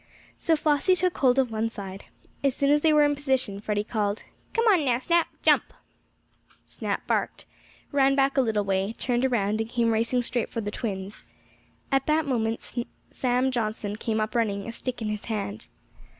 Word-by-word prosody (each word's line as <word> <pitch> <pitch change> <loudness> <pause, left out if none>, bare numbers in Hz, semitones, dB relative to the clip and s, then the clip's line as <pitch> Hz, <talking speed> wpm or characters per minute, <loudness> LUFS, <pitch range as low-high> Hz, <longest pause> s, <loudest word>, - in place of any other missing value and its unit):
So 325 - +1
Flossie 305 +4 +2
took 365 -1 0
hold 255 -1 +4
of 260 -3 +2
one 220 +1 -1
side. 195 -3 -8 0.4
As 275 -2 +2
soon 280 0 +2
as 295 0 +4
they 320 - +4
were 300 -1 +5
in 290 0 +3
position, 265 -8 -1
Freddie 205 0 -1
called: 210 -1 -2 0.3
"Come 460 0 +1
on 375 -8 +5
now, 250 -4 +2
Snap. 335 +6 +2 0.2
Jump!" - - +4 0.9
Snap - - -4
barked, - - -1 0.5
ran 275 -1 +4
back 275 0 +2
a 270 - +5
little 220 -4 +1
way, 195 +2 0
turned 245 0 0
around 215 -4 +1
and 225 - -4
came 235 -2 +1
racing 230 +3 +1
straight 240 -1 -2
for 230 - -4
the 205 -2 -3
twins. 200 -3 -5 0.7
At 270 0 +2
that 310 0 +2
moment 230 -4 -1 0.4
Sam 255 +1 +1
Johnson 215 -3 -2
came 220 0 -2
up 215 0 -1
running, 205 -4 0
a - - -3
stick 245 0 -5
in 215 - -1
his 210 -1 -4
hand. 210 -1 -3
235 Hz, 185 wpm, -26 LUFS, 215-275 Hz, 0.9 s, were